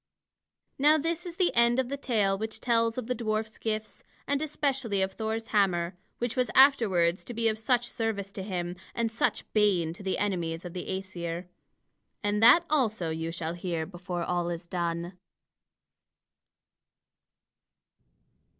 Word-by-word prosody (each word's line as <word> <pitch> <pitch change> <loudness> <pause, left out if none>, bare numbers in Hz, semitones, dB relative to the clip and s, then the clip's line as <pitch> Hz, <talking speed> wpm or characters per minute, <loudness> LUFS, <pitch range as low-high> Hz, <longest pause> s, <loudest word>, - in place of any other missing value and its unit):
Now 300 +3 +6
this 330 +3 -2
is 340 - -7
the 360 -1 +2
end 235 +1 +5
of 260 -2 +1
the 280 - -2
tale 220 -8 +1
which 220 +2 -4
tells 230 -1 +1
of 250 - -3
the 250 - -1
dwarf's 220 -2 -2
gifts, 215 -1 -4 0.2
and 285 +1 0
especially 270 -8 -1
of 190 - -1
Thor's 220 +2 -3
hammer, 180 -4 +2 0.2
which 240 0 -2
was 250 -1 +1
afterwards 200 -11 +5
to 240 - -8
be 230 0 +2
of 215 -1 0
such 240 +1 +1
service 215 -4 -3
to 195 - -6
him 180 -2 -3 0.2
and 230 -1 0
such 225 - 0
bane 190 -7 +3
to 175 - -12
the 190 -1 -1
enemies 175 -4 -2
of 175 - -7
the 180 - -5
Æsir. 180 -2 -4 0.8
And 205 +1 +1
that 315 +10 +7
also 220 - +1
you 160 +1 -3
shall 165 -1 -3
hear 170 -2 -3
before 175 0 -5
all 175 0 -1
is 170 0 -4
done. 170 0 -3
210 Hz, 155 wpm, -28 LUFS, 175-235 Hz, 0.8 s, that